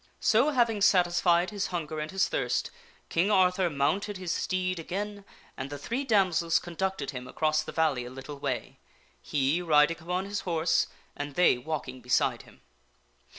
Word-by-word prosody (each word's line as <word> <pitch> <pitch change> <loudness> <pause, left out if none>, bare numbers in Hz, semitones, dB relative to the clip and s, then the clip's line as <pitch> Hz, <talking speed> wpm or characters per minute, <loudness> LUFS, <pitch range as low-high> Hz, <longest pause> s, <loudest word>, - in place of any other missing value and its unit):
So, 235 +7 +4
having 235 -7 +1
satisfied 175 -2 +3
his 200 -2 -2
hunger 160 -3 -4
and 155 0 -4
his 190 0 +1
thirst, - - -1 0.4
King 175 +5 +1
Arthur 185 -2 +3
mounted 190 +8 0
his 185 -2 -3
steed 185 -1 -1
again, 200 +4 -5 0.3
and 130 +1 -5
the 145 - -6
three 240 - -3
damsels 185 - +2
conducted 175 -4 -3
him 125 -2 -7
across 155 +1 +1
the - - -7
valley 150 -7 +1
a - - -7
little 135 +3 -9
way 135 -3 -4 0.4
he 145 - 0
riding 155 -1 +4
upon 180 +3 -2
his 200 +1 -3
horse 165 -1 +1 0.3
and 145 -1 -6
they 180 - +5
walking 130 -3 -5
beside 125 - +1
him. - - -19
175 Hz, 160 wpm, -28 LUFS, 150-190 Hz, 0.4 s, they